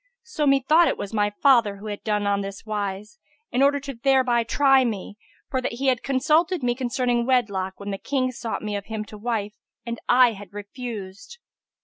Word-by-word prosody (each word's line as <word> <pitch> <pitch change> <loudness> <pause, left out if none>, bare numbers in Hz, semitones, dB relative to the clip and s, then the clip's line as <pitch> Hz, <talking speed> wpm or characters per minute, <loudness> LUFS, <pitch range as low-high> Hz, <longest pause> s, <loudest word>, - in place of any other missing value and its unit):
So 385 -11 -2
methought 290 +5 +4
it - - 0
was 200 - -6
my 205 -1 +2
father 230 -2 +3
who 200 - -11
had 205 -1 -6
done 210 -1 0
on 200 0 +1
this 195 +2 -7
wise 210 - -4 0.3
in 250 - +1
order 285 +1 +4
thereby 260 -2 +1
to 230 - -25
try 270 -2 +5
me, 210 -4 -4 0.4
for 260 - 0
that 250 - -3
he 265 +3 0
had 250 -2 +1
consulted 305 +5 +1
me 245 -1 +2
concerning 245 -1 -1
wedlock, 200 -7 0
when 200 0 -5
the 195 - -4
Kings 255 -3 -2
sought 225 - -4
me 210 -1 -3
of 200 -1 -4
him 220 -1 -5
to 210 - -11
wife, 210 -2 -2 0.3
and 235 -1 -4
I 250 -1 +6
had 200 -2 -11
refused. 205 - -8
235 Hz, 200 wpm, -24 LUFS, 205-265 Hz, 0.4 s, I